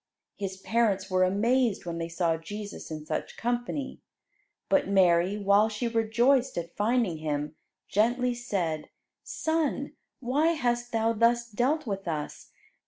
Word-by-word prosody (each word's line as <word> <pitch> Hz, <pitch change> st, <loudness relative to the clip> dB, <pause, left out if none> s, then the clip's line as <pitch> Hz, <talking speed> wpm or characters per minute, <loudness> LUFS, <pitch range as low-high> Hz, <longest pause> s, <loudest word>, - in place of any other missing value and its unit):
His 190 Hz, -1 st, -5 dB
parents 205 Hz, -2 st, 0 dB
were 185 Hz, 0 st, +3 dB
amazed 225 Hz, +4 st, +2 dB
when 170 Hz, -1 st, -4 dB
they 165 Hz, 0 st, -3 dB
saw 170 Hz, -1 st, +1 dB
Jesus 205 Hz, +5 st, -7 dB
in 155 Hz, -1 st, -6 dB
such -, -, -4 dB
company. 245 Hz, +4 st, -3 dB, 0.7 s
But 285 Hz, -1 st, +2 dB
Mary, 185 Hz, 0 st, +3 dB
while 200 Hz, +1 st, +4 dB
she 220 Hz, +3 st, -2 dB
rejoiced 235 Hz, +3 st, +2 dB
at 170 Hz, 0 st, -5 dB
finding 220 Hz, -5 st, +1 dB
Him, 150 Hz, -1 st, -3 dB, 0.3 s
gently 245 Hz, +4 st, +2 dB
said, 185 Hz, -10 st, -3 dB, 0.3 s
"Son, 315 Hz, -3 st, -1 dB, 0.3 s
why 290 Hz, +7 st, +2 dB
hast 240 Hz, -4 st, -1 dB
Thou 225 Hz, 0 st, +1 dB
thus 235 Hz, +1 st, +2 dB
dealt 255 Hz, +8 st, 0 dB
with 195 Hz, -4 st, -4 dB
us? 150 Hz, -3 st, -4 dB
220 Hz, 135 wpm, -28 LUFS, 185-245 Hz, 0.7 s, while